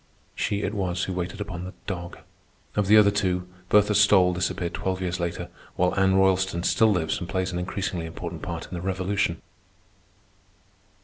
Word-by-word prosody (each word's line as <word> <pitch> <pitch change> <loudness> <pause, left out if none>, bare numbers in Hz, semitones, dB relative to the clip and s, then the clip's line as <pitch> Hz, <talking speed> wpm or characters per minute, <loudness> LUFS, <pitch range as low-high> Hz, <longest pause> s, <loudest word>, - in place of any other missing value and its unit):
She 105 0 -1
it 100 - -2
was 90 -4 -1
who 95 - -2
waited 90 +2 -4
upon 90 -4 -5
the 95 - -8
dog. 85 -3 -5 0.6
Of 105 -2 +1
the 105 +2 +7
other 105 -1 +6
two, 90 -3 0 0.2
Bertha 105 0 +4
Stole 95 -3 +5
disappeared 90 -1 -2
twelve 95 -1 -2
years 90 -1 -2
later, 85 0 -3 0.3
while 90 0 +2
Anna 95 0 +3
Roylston 95 -2 +2
still 110 - +4
lives 90 -5 0
and 90 - -6
plays 95 -1 -1
an 90 - -2
increasingly 90 -2 -3
important 85 0 -7
part 85 -2 -5
in - - -12
the 85 - -4
Revolution. 95 -1 -1
95 Hz, 175 wpm, -25 LUFS, 90-100 Hz, 0.6 s, the